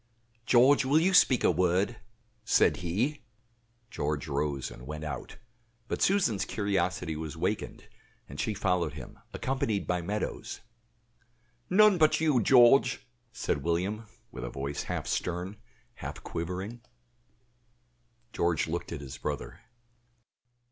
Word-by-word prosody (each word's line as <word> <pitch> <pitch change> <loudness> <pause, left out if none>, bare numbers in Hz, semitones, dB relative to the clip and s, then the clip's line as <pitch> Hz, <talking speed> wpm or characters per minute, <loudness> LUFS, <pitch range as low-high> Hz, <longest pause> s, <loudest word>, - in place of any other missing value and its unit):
"George, 130 +3 +5
will 140 +4 +3
you 185 +4 +2
speak 130 - +5
a - - +5
word?" 90 +6 +1 0.5
said 110 - +3
he. 105 - -1 0.7
George 75 -2 -2
rose 70 -2 -2
and - - -11
went 75 +1 -6
out; 75 -4 -6 0.5
but - - -3
Susan's 150 - +2
curiosity 90 -5 -1
was 80 0 -6
wakened, - - -3 0.4
and - - -10
she 110 - -1
followed 90 -5 0
him, 65 -5 -10
accompanied 130 - -1
by 90 -1 -1
Meadows. 105 +5 -4 1.1
"None 205 0 +6
but 155 -1 +4
you, 150 -6 +3
George," 125 +2 +5 0.3
said 80 - -2
William, 95 +8 -1 0.2
with - - -7
a - - -4
voice 70 +1 -4
half - - -3
stern, 90 +4 -3 0.4
half - - -8
quivering. 95 +8 -5 1.5
George 85 -3 +1
looked 85 +2 -4
at 80 -4 -5
his 65 -3 -8
brother. - - -5
95 Hz, 125 wpm, -29 LUFS, 80-125 Hz, 1.5 s, None